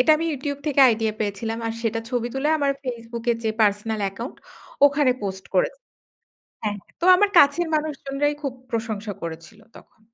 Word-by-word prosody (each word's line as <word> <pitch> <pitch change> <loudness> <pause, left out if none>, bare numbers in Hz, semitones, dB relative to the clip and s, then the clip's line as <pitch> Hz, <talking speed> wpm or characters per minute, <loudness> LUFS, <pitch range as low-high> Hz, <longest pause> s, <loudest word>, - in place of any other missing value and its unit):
এটা 255 - +4
আমি 330 - -2
YouTube 285 +1 -4
থেকে 280 -2 +2
আইডিয়া 220 -1 +1
পেয়েছিলাম। 220 +2 -2
আর 225 - -1
সেটার 225 0 -1
ছবি 240 -1 -1
তুলে 275 +3 0
আমার 280 -1 +2
Facebook 235 -1 -5
এ - - +3
যে 220 - +2
পার্সোনাল 210 +1 +1
অ্যাকাউন্ট 200 +6 -4 0.5
ওখানে 285 -2 +3
পোস্ট 190 -1 -4
করেছি। - - +1 0.8
হ্যাঁ, 210 -1 -1
হ্যাঁ। - - -29
তো - - -2
আমার 410 +1 +3
কাছের 290 +4 +5
মানুষজনরাই 290 -1 -1
খুব 275 -3 -2 0.2
প্রশংসা 220 -2 -3
করেছিল 165 +6 -8 0.2
তখন। - - -18
235 Hz, 170 wpm, -23 LUFS, 220-285 Hz, 0.8 s, কাছের